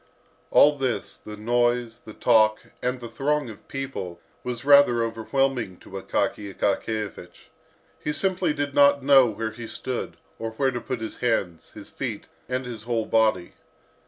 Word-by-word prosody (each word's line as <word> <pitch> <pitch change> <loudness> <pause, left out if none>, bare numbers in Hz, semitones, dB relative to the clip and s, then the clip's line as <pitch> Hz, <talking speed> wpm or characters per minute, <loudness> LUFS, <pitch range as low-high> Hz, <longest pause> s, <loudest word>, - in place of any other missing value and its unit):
All 145 -1 +5
this, 130 -3 -2
the 105 0 -10
noise, 120 +1 0
the 110 - -10
talk, 110 -2 +4 0.2
and 125 +1 -1
the 120 - -7
throng 145 0 -1
of 105 - -15
people, 135 -11 -5 0.2
was 125 0 -4
rather 140 -5 +6
overwhelming 115 -2 -1
to - - -16
Akaky 100 +1 -2
Akakiyevich. 100 -2 -3 0.5
He - - 0
simply 185 0 +1
did 145 -1 -2
not 140 -1 +5
know 135 -2 +7
where 110 0 -3
he 115 +1 -8
stood, 125 +2 -4 0.2
or 115 0 -4
where 135 +3 +1
to 120 -1 -4
put 125 -3 -4
his 110 - -5
hands, 100 -9 -1
his - - -11
feet, - - -5 0.2
and 130 0 -2
his 120 -3 -7
whole 115 -1 -1
body. 110 -6 +2
120 Hz, 160 wpm, -25 LUFS, 110-135 Hz, 0.5 s, know